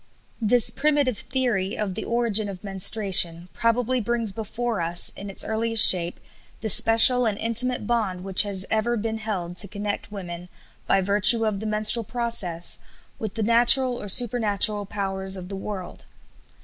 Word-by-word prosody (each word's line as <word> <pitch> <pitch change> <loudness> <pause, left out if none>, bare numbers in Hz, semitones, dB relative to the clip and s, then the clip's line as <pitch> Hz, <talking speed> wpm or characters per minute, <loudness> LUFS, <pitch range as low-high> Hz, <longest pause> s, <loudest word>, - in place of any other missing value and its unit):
This 230 +1 +3
primitive 290 -6 0
theory 235 -7 -3
of 205 -3 -3
the - - -6
origin 230 -3 -1
of 190 -1 -10
menstruation 190 -3 0
probably 240 +5 -1
brings 230 -1 -2
before 225 0 -4
us 170 +1 -1
in 200 +1 -9
its 195 - -1
earliest 225 0 +5
shape 175 -1 +3 0.4
the 220 - -3
special 230 +4 +6
and 205 -2 -2
intimate 230 +1 -1
bond 205 -6 -2
which 190 -1 +4
has 195 -2 -2
ever 230 +2 0
been 220 +1 -4
held 185 -5 -5
to 200 - -1
connect 205 +1 -6
women, 180 -3 -8 0.4
by 195 - +2
virtue 205 +4 +3
of 210 -2 -2
the 220 - -6
menstrual 215 +2 +2
process, 220 -7 -3 0.4
with 215 -3 -6
the 225 - -2
natural 240 +3 +4
or 205 - -8
supernatural 210 -2 +1
powers 195 -1 -4
of 180 0 -10
the 195 - -6
world. 195 -2 -8
210 Hz, 160 wpm, -23 LUFS, 195-230 Hz, 0.4 s, special